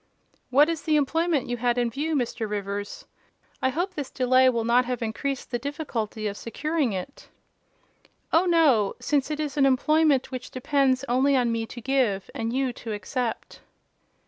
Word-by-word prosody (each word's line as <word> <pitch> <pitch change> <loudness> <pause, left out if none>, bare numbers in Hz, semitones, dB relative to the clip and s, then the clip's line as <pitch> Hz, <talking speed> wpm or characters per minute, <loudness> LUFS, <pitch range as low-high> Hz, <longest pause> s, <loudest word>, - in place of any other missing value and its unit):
"What 280 +4 +5
is 330 -2 -2
the 310 -2 +1
employment 315 +1 +1
you 245 0 -2
had 240 +1 0
in 240 -1 +1
view, 305 +6 -2
Mr. 235 -4 -2
Rivers? 205 - -4 0.6
I 260 - +2
hope 350 +8 -2
this 290 -6 -5
delay 255 0 +4
will 235 -2 0
not 240 +2 +4
have 245 -1 -3
increased 265 +5 -3
the 240 - -1
difficulty 235 -6 -4
of 205 -1 -2
securing 300 +2 -1
it." 190 +8 -7 1.0
"Oh, 340 +3 +4
no; 290 - +3
since 285 -2 0
it 305 0 -3
is 295 -2 -3
an 275 - +5
employment 285 0 +3
which 255 -1 -6
depends 265 0 +1
only 265 +3 +3
on 245 -2 +2
me 225 -1 -2
to 240 - -9
give, 245 -7 0
and 225 0 -3
you 260 0 0
to 230 -1 -7
accept." 230 +3 -4
255 Hz, 170 wpm, -25 LUFS, 235-290 Hz, 1.0 s, What